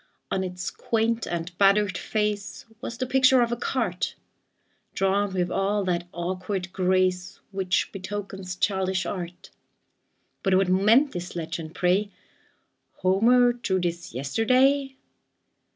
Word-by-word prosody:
On 190 - 0
its 180 0 -4
quaint 230 0 -1
and 170 0 -4
battered 200 0 +4
face 210 -2 -2 0.2
Was 240 -2 -5
the 255 - -1
picture 260 0 +5
of 235 - -2
a - - +1
cart, 230 -7 -2 0.8
Drawn 195 +1 +1
with 180 -1 -1
all 200 +2 0
that 175 -2 -1
awkward 185 +1 -4
grace 185 -1 +1
Which 190 -2 0
betokens 195 -1 -6
childish 190 -1 0
art; 180 -2 -6 0.9
But 190 -2 +2
what 190 -1 +3
meant 220 +10 +4
this 180 0 -6
legend, 165 -1 -5
pray: 190 +3 +2 0.9
"Homer 240 +6 +4
drew 215 -6 -1
this 175 -1 -3
yesterday?" 255 - +2
190 Hz, 120 wpm, -25 LUFS, 180-225 Hz, 0.9 s, picture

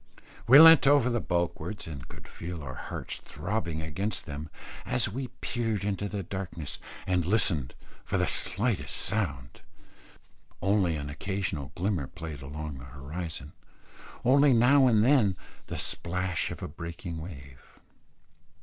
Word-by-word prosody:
We 130 +4 +10
leant 165 -2 +9
over 140 -3 +5
the 120 - +1
bulwarks, 85 +4 -2
and 70 -6 -8
could - - -12
feel 85 -2 -7
our 70 -1 -6
hearts - - -6
throbbing 85 -7 -3
against 95 +6 -3
them, 75 0 -6 0.3
as 125 - +2
we 125 +6 -4
peered 115 -5 -1
into 100 0 -1
the 100 +1 -3
darkness 85 -5 -5 0.3
and 90 -2 +1
listened 85 - +1 0.3
for - - -1
the - - +2
slightest 105 +2 0
sound; 75 - -2 1.0
only 95 -3 +2
an 70 -1 -4
occasional 80 -3 -3
glimmer 90 -6 -1
played 80 -2 -8
along 75 0 -6
the - - -10
horizon, 75 +3 -6 0.7
only 140 +2 +6
now 130 +3 +6
and 110 -3 +4
then 120 -9 +4 0.3
the - - -4
splash 90 0 -1
of - - -7
a - - -3
breaking 85 +2 -6
wave. 70 -6 -10
90 Hz, 140 wpm, -29 LUFS, 75-110 Hz, 1.0 s, We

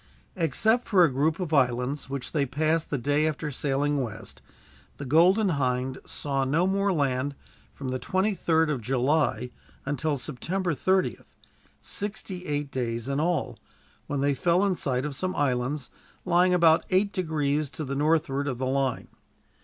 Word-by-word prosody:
Except 215 - +1
for 190 -4 +5
a 155 -6 +3
group 155 +5 +1
of 175 -4 -3
islands 130 0 +1
which 135 -2 -4
they 145 -3 0
passed 155 +4 0
the 145 - -1
day 145 +4 +1
after 155 0 -3
sailing 140 +1 0
west, 115 -5 -7 0.6
the 145 - -6
Golden 180 - +4
Hind 130 -3 -1
saw 135 -2 -2
no 150 +7 +2
more 195 +1 +1
land 140 -3 0 0.4
from 135 -2 -6
the 130 0 -2
23rd 170 - +1
of 135 -5 -2
July 125 0 +1 0.3
until 145 +1 -1
September 170 +8 -2
30th, 185 +5 -1 0.5
sixty 200 -3 -4
eight 145 -1 -2
days 120 -2 -3
in 140 +1 -1
all, 170 +2 -1 0.5
when 140 -1 -2
they 140 0 +2
fell 175 +8 +2
in 195 -2 +1
sight 130 -4 -1
of 145 -2 -4
some 185 +5 -2
islands, 130 0 -1 0.3
lying 180 +1 +4
about 170 -2 +5
eight 195 +2 +2
degrees 155 -5 0
to 155 +1 -6
the 135 - -4
northward 145 -1 +1
of 130 -4 -2
the 130 - -2
line. 130 -1 -1
145 Hz, 160 wpm, -27 LUFS, 135-170 Hz, 0.6 s, for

